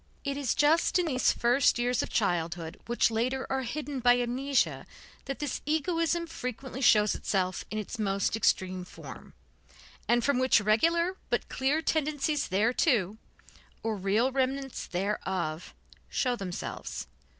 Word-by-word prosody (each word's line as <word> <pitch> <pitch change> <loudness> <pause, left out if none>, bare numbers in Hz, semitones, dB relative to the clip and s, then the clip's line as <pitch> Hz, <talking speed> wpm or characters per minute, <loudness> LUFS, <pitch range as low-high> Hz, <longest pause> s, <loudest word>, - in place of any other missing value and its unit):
It 280 -1 -2
is 275 -4 -1
just 315 +5 +3
in 360 - +1
these 260 -5 +2
first 245 +2 +3
years 245 +1 +1
of - - -4
childhood 170 -3 -1
which 240 -1 +2
later 255 +4 -1
are 265 0 0
hidden 280 +2 -4
by 245 0 +5
amnesia, 255 +3 0 0.4
that 275 0 -4
this 295 -3 -3
egoism 330 +2 0
frequently 260 -4 -6
shows 210 -5 +5
itself 185 -2 -1
in 215 -1 -3
most 200 0 0
extreme 185 -4 +1
form, 180 - -11 0.7
and 240 0 +3
from 280 -1 +2
which 255 -2 +4
regular 335 - +2
but - - -1
clear 280 +4 0
tendencies 300 -2 0
thereto, 215 - +1 0.6
or 225 -1 -1
real 205 +6 +1
remnants 270 0 -2
thereof, 180 -3 -3 0.3
show 250 -2 0
themselves. 190 -5 -5
245 Hz, 135 wpm, -29 LUFS, 210-280 Hz, 0.7 s, by